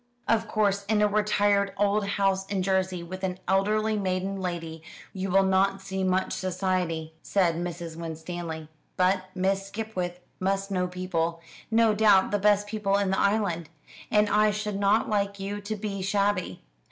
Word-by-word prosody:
"Of 225 0 +2
course 205 -2 +1
in 210 +1 +1
a - - +5
retired 205 -1 +2
old 205 0 +2
house 195 -1 +1
in 195 -2 -1
Jersey, 185 -2 0
with 185 +2 -8
an 185 -1 -1
elderly 215 +3 +2
maiden 190 0 -1
lady, 165 -3 -4 0.3
you 190 0 -3
will 195 +1 +4
not 195 +1 +2
see 190 0 -4
much 185 0 +1
society," 180 -4 -2
said 185 -4 +2
Mrs. 170 -1 -5
Winstanley; 165 -1 -6 0.3
"but 185 +1 +2
Miss 195 +1 0
Skipwith 195 -4 -4 0.2
must 195 +1 -1
know 180 -1 0
people 170 -2 -2 0.3
no 225 -1 +4
doubt 205 -3 +4
the 205 - +1
best 205 0 +3
people 205 -2 0
in 200 -2 +1
the 190 - +1
island 200 -6 +1 0.4
and 210 0 +4
I 210 +1 +4
should 210 -1 -2
not 205 +2 +3
like 200 -1 -1
you 200 +1 -4
to 210 +2 -4
be 200 -2 -4
shabby. 200 - 0
195 Hz, 165 wpm, -27 LUFS, 185-205 Hz, 0.4 s, a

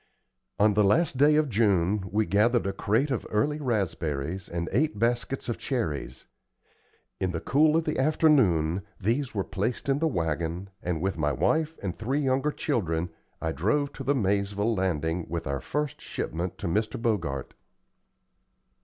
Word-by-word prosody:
On 105 0 +4
the 105 +1 +4
last 140 - +3
day 150 +3 +5
of 155 0 +3
June 100 -4 +1
we 110 +2 +2
gathered 110 +6 +3
a 100 - -1
crate 110 +9 +1
of 130 - -1
early 145 +9 +1
raspberries 90 - -2
and 85 0 -3
eight 125 0 +1
baskets 120 +4 0
of 120 - -3
cherries. 75 - -3 0.9
In 95 - 0
the 80 - -1
cool 150 - +3
of 165 - +1
the 155 - -2
afternoon, 125 - +3 0.2
these 120 +5 -1
were 100 - +1
placed 105 +9 -2
in 135 +1 +2
the 165 - +2
wagon, 85 - -2
and 85 -3 -2
with 95 -4 -1
my 75 -1 +2
wife 160 - +1
and 95 -3 -2
the - - -25
three 130 +6 -1
younger 135 +2 +1
children, 90 - -1 0.3
I 80 - -1
drove 110 - 0
to - - -7
the 140 - +2
Maizeville 100 0 +1
Landing 85 -2 -1
with 85 0 -3
our 70 0 -2
first 150 0 -3
shipment 85 +3 -4
to - - -4
Mr. 110 +6 -1
Bogart. 85 - -1
105 Hz, 165 wpm, -27 LUFS, 85-135 Hz, 0.9 s, day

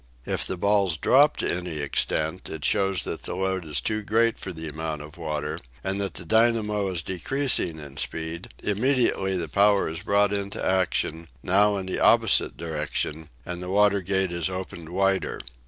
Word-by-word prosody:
If - - 0
the 95 - -3
balls 100 -3 +2
drop 140 - +4
to - - -1
any 90 -3 -5
extent, 80 +4 -1
it 80 -2 -5
shows 95 -1 +2
that - - -5
the - - -5
load 95 0 -1
is 75 -2 -1
too 110 0 -2
great 115 +3 +1
for 95 - -5
the 80 -1 -7
amount 80 0 -4
of 75 0 -12
water, 75 -1 -3 0.2
and 95 +1 -1
that 100 - -3
the 85 - -8
dynamo 110 0 +2
is 85 -3 -2
decreasing 105 - +1
in 70 -3 -10
speed; 80 +3 -3
immediately 105 -4 +1
the 85 -2 -3
power 100 +6 +3
is 80 +1 -5
brought 100 0 +2
into 100 0 -3
action, 90 -3 0 0.2
now 100 +2 +3
in 95 - -4
the 95 - -3
opposite - - +4
direction, 80 -1 -4 0.2
and 90 0 -5
the 90 - -6
water 100 0 +3
gate 95 0 0
is 85 -1 -1
opened 90 -3 -6
wider. 95 +1 0
95 Hz, 180 wpm, -25 LUFS, 80-100 Hz, 0.2 s, drop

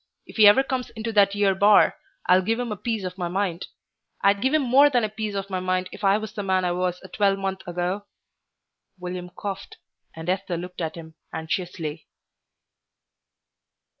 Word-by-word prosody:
If - - -13
he 215 -2 +8
ever 210 +6 +7
comes 260 -2 -3
into 225 0 -5
that 200 -1 +4
'ere 200 -1 +3
bar, 205 +2 +5 0.3
I'll 185 +1 +5
give 225 +5 -1
him 245 -2 -3
a - - -2
piece 220 0 -3
of 185 +1 -6
my 175 - -1
mind. 180 -1 -2 0.6
I'd 200 0 +3
give 265 - +2
him 310 -1 +2
more 270 +4 +6
than 245 -4 +2
a 215 - 0
piece 215 -1 -4
of 195 0 -4
my 185 - -1
mind 185 0 -1
if - - -11
I 195 +1 +4
was 215 -1 -6
the 205 - -4
man 190 -2 +1
I 175 - +1
was 180 0 -1
a - - -9
twelvemonth 195 -1 0
ago." 180 +3 -3 0.9
William 180 0 -6
coughed, 195 +2 -7 0.4
and 160 +1 -8
Esther 185 -1 -1
looked 180 +1 -7
at 160 -1 -3
him 160 -1 -10 0.2
anxiously. 160 -1 -4
195 Hz, 190 wpm, -24 LUFS, 180-210 Hz, 0.9 s, he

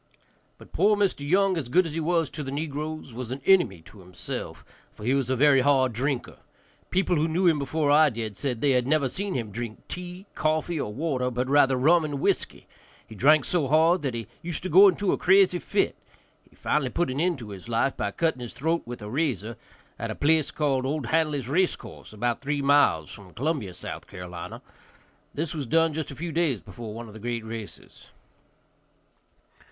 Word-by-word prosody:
But - - -17
poor 205 +4 +4
Mr. 200 -6 +1
Young, 185 +6 +2
as 135 -7 -4
good 180 +8 +4
as 160 - -5
he 165 - -2
was 165 -2 0
to 155 - -6
the 135 - -5
negroes, 150 -1 -4
was 120 0 -6
an 130 +2 -4
enemy 175 - +3
to 105 - -16
himself, 90 -1 -7 0.3
for - - -13
he 125 +4 +1
was 135 -3 0
a 130 - +2
very 140 0 +5
hard 130 -2 +3
drinker. 130 +2 -2 0.5
People 185 -2 +1
who 155 +2 +2
knew 170 +4 0
him 165 -4 +4
before 145 +1 0
I 150 +1 +6
did 110 -4 -5
said 125 -1 -3
they 135 -3 +3
never 140 +3 +1
had 130 - -2
seen 200 0 -3
him 115 -4 -3
drink 115 +1 -7
tea, 180 +1 -7
coffee, 155 +1 0
or 105 - -4
water, 130 0 -1
but 125 +1 -2
rather 135 -1 +4
rum 160 +6 +4
and 145 -2 -3
whiskey; - - -1 0.4
he - - -13
drank 150 +8 +4
so 170 -6 0
hard 160 +5 +4
that 135 -5 -2
he 115 -1 -4 0.2
used 175 -2 -4
to 185 - -3
go 190 +5 +8
into 195 +1 +1
a - - -1
crazy 190 -1 +4
fit; - - 0 0.5
he - - -25
finally 135 -4 0
put 175 +1 -1
an 135 - -3
end 175 +1 +1
to 115 -5 -9
his 100 +2 -10
life 115 +4 +1
by 100 - -2
cutting 160 +3 -1
his 120 - -7
throat 165 +4 0
with 120 -3 -7
a - - -6
razor, 120 - -2 0.4
at - - -3
a - - -4
place 155 0 +2
called 140 -4 0
O'Handly's 150 0 0
race 180 +7 +2
course, - - -12
about 115 +2 -2
three 145 0 -2
miles 140 - +3
from 95 -3 -13
Columbia, 140 - -1
S.C. 90 0 -10 1.5
This 155 +2 -2
was 145 -6 -4
done 165 +3 +3
just 155 0 -4
a 140 - -8
few 170 +4 -5
days 155 -7 +1
before 115 +1 -9
one 115 +2 -7
of 105 - -12
the 110 - -10
great 115 0 -4
races. 110 -2 -9
145 Hz, 205 wpm, -26 LUFS, 120-165 Hz, 1.5 s, go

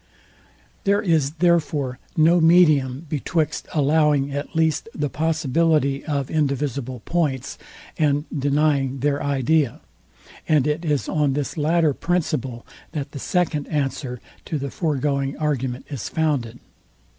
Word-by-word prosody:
There 200 +2 +2
is 155 -6 +2
therefore 155 -6 +1 0.2
no 165 +2 +5
medium 155 -5 +4
betwixt 155 +1 -1
allowing 150 -1 +2
at 145 +4 -5
least 160 +5 +1
the 145 -3 -2
possibility 155 -2 +1
of 140 -4 -2
indivisible 140 -4 -1
points, 150 -7 -1 0.4
and 145 -1 +2
denying 140 -2 +1
their 145 0 +1
idea; 140 -1 +1 0.7
and 150 -4 +3
it 150 +3 -1
is 150 -4 0
on 145 -3 +1
this 145 0 -3
latter 160 0 +2
principle, 140 -8 -2 0.3
that 145 -3 -4
the 140 - -7
second 160 -2 0
answer 135 -4 -2 0.3
to 155 - -2
the 140 -1 -4
foregoing 140 -3 -1
argument 135 -4 -2
is 140 -7 -5
founded. 140 -8 -1
145 Hz, 120 wpm, -22 LUFS, 135-160 Hz, 0.7 s, no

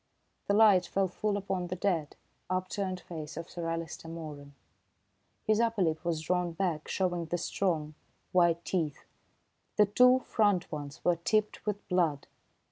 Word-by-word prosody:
The 200 - +3
light 205 -5 +6
fell 195 +1 +1
full 205 +3 -1
upon 190 -2 -2
the 180 - -3
dead, 175 -5 -1 0.3
upturned 185 0 -2
face 155 -3 -7
of 165 0 -5
Sir 170 -1 -4
Alister 165 0 -4
Moeran. 150 -4 -8 0.9
His 215 0 +2
upper 230 -4 +2
lip 160 -1 0
was 170 -2 -1
drawn 180 0 0
back, 165 -4 -1
showing 175 -3 -1
the 175 - -1
strong, 165 -5 -1 0.4
white 170 -2 +3
teeth. 160 -6 -2 0.7
The 210 - +6
two 250 +5 +6
front 205 -7 +1
ones 145 -2 -7
were 175 -1 +4
tipped 210 +5 0
with 205 -1 -3
blood. 165 -6 +1
175 Hz, 150 wpm, -30 LUFS, 165-195 Hz, 0.9 s, light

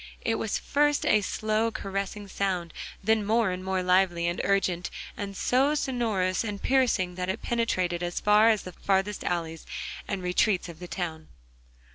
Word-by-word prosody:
It 225 -1 0
was 220 - -1
first 295 0 +1
a 215 - +4
slow, 215 +3 0
caressing 200 0 -4
sound, 185 -4 -2 0.3
then 220 +1 +3
more 220 -1 +2
and 180 0 -4
more 190 -1 -1
lively 180 -2 +3
and 175 +1 -1
urgent, 185 -3 +1 0.3
and 200 -1 -5
so 270 +4 +2
sonorous 225 -10 0
and 205 -3 -4
piercing 235 -9 +2
that 180 - -1
it 190 - -3
penetrated 185 -7 0
as 175 0 -2
far 210 +2 +5
as 215 -2 +2
the 185 - -7
farthest 195 +3 0
alleys 165 -2 -2 0.4
and 195 -2 -3
retreats 180 +2 +2
of 165 -2 -10
the 180 - -7
town. 160 -3 -4
195 Hz, 165 wpm, -27 LUFS, 180-220 Hz, 0.4 s, far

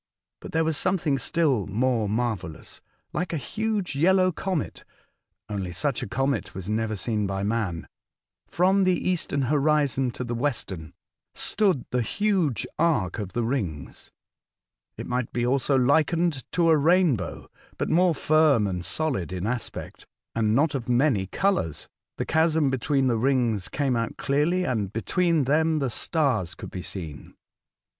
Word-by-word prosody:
But - - -9
there 160 0 +2
was 160 -2 0
something 170 -7 +1
still 140 - +1
more 115 0 0
marvellous. 105 -8 -3 0.3
Like 175 -1 -2
a - - 0
huge 205 - -2
yellow 185 +5 +4
comet 180 -1 -3 0.6
(only 100 -4 -4
such 130 - -2
a - - -4
comet 135 +6 -1
was 95 -1 -6
never 110 +1 -1
seen 105 0 -1
by 95 0 -2
man), 100 -6 -2 0.6
from 190 +3 +3
the 185 -1 +3
eastern 175 -6 0
horizon 140 -1 +2
to - - -4
the 120 -1 -4
western, 115 - -3 0.4
stood 190 - +1
the 125 - +1
huge 185 - 0
arc 115 - +1
of 100 -3 -5
the 120 - 0
rino^s. 100 - -4 0.9
It - - -5
might 125 -1 -2
be 120 0 -1
also 135 +2 +1
likened 155 +3 +2
to 170 -2 +3
a 160 - +5
rainbow, 155 - +2 0.3
but - - -1
more 175 0 +3
firm 155 -8 +3
and 90 -3 -3
solid 110 - -2
in 90 0 -3
aspect, 120 +2 -5 0.3
and 110 -1 +1
not 145 +3 +2
of 125 -3 -4
many 120 -6 +2
colours. 180 - -1 0.3
The - - -2
chasm 160 -3 +2
between 135 +1 +1
the 120 -3 +2
rings 120 -5 +1
came 140 -3 0
out 115 0 -2
clearly, 155 +6 +1
and 110 - -1
between 165 +8 +1
them 155 +4 +2
the 135 -4 -1
stars 115 - 0
could - - -9
be 90 - -5
seen. 85 -5 -7
135 Hz, 150 wpm, -25 LUFS, 110-160 Hz, 0.9 s, a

